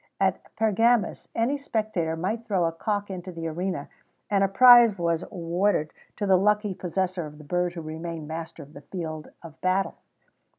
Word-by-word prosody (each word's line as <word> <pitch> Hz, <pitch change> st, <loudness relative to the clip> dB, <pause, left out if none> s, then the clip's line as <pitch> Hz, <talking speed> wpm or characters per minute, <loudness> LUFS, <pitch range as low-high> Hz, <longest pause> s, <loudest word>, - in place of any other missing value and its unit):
At -, -, +1 dB
Pergamus, 225 Hz, +1 st, +2 dB
any 255 Hz, +6 st, +1 dB
spectator 215 Hz, -, -1 dB
might 200 Hz, +8 st, -2 dB
throw 195 Hz, -6 st, +1 dB
a 165 Hz, -, +1 dB
cock 205 Hz, +4 st, -2 dB
into 185 Hz, 0 st, -6 dB
the 165 Hz, -1 st, -6 dB
arena, 170 Hz, -2 st, -3 dB, 0.4 s
and 200 Hz, -1 st, +3 dB
a -, -, +4 dB
prize 240 Hz, 0 st, +7 dB
was 170 Hz, -2 st, 0 dB
awarded 175 Hz, -2 st, -1 dB, 0.2 s
to 210 Hz, -, -1 dB
the 190 Hz, -2 st, +5 dB
lucky 210 Hz, 0 st, +2 dB
possessor 180 Hz, -1 st, -2 dB
of 150 Hz, 0 st, -12 dB
the 150 Hz, -, -12 dB
bird 175 Hz, +3 st, -1 dB
who 170 Hz, -, -6 dB
remained 160 Hz, 0 st, -6 dB
master 160 Hz, 0 st, -6 dB
of 145 Hz, +2 st, -17 dB
the 140 Hz, -, -11 dB
field 160 Hz, -3 st, -6 dB
of 160 Hz, -2 st, -12 dB
battle. 185 Hz, +1 st, 0 dB
180 Hz, 175 wpm, -26 LUFS, 165-205 Hz, 0.4 s, prize